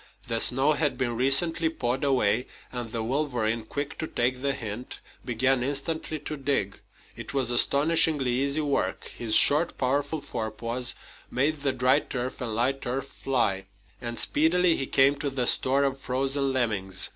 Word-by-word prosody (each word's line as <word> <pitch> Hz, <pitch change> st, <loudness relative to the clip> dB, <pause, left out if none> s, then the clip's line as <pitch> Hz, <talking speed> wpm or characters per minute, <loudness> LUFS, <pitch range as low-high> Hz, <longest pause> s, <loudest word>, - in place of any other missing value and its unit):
The 115 Hz, -1 st, 0 dB
snow 135 Hz, +6 st, +2 dB
had 150 Hz, -1 st, 0 dB
been 120 Hz, -2 st, -2 dB
recently 160 Hz, +6 st, +4 dB
pawed 130 Hz, -4 st, -3 dB
away, 125 Hz, -3 st, +1 dB, 0.2 s
and 120 Hz, -3 st, -6 dB
the 115 Hz, -1 st, -3 dB
wolverine, 120 Hz, -4 st, -1 dB
quick 140 Hz, +5 st, -5 dB
to 160 Hz, -, -3 dB
take 125 Hz, 0 st, -1 dB
the 140 Hz, 0 st, 0 dB
hint, 115 Hz, 0 st, -7 dB, 0.2 s
began 125 Hz, +2 st, +1 dB
instantly 145 Hz, +4 st, -2 dB
to 150 Hz, 0 st, -5 dB
dig. 135 Hz, -8 st, -2 dB, 0.4 s
It -, -, -8 dB
was 130 Hz, -3 st, +2 dB
astonishingly 145 Hz, +1 st, +3 dB
easy 140 Hz, +4 st, 0 dB
work. 145 Hz, -2 st, -1 dB
His 110 Hz, -2 st, -1 dB
short, 155 Hz, +4 st, +6 dB
powerful 140 Hz, +4 st, -1 dB
forepaws 115 Hz, +1 st, -4 dB, 0.3 s
made 145 Hz, +3 st, 0 dB
the 140 Hz, -1 st, +1 dB
dry 130 Hz, 0 st, +2 dB
turf 125 Hz, 0 st, -6 dB
and 115 Hz, -3 st, -4 dB
light 135 Hz, +4 st, -1 dB
earth 135 Hz, +2 st, -3 dB
fly, 100 Hz, -10 st, -2 dB, 0.3 s
and 120 Hz, -1 st, -5 dB
speedily 165 Hz, +3 st, +3 dB
he 135 Hz, -, -3 dB
came 135 Hz, +1 st, +3 dB
to 145 Hz, 0 st, -3 dB
the 130 Hz, -2 st, -2 dB
store 135 Hz, +3 st, +3 dB
of 135 Hz, -1 st, -1 dB
frozen 135 Hz, +2 st, -1 dB
lemmings. 100 Hz, -7 st, 0 dB
135 Hz, 160 wpm, -26 LUFS, 120-145 Hz, 0.4 s, short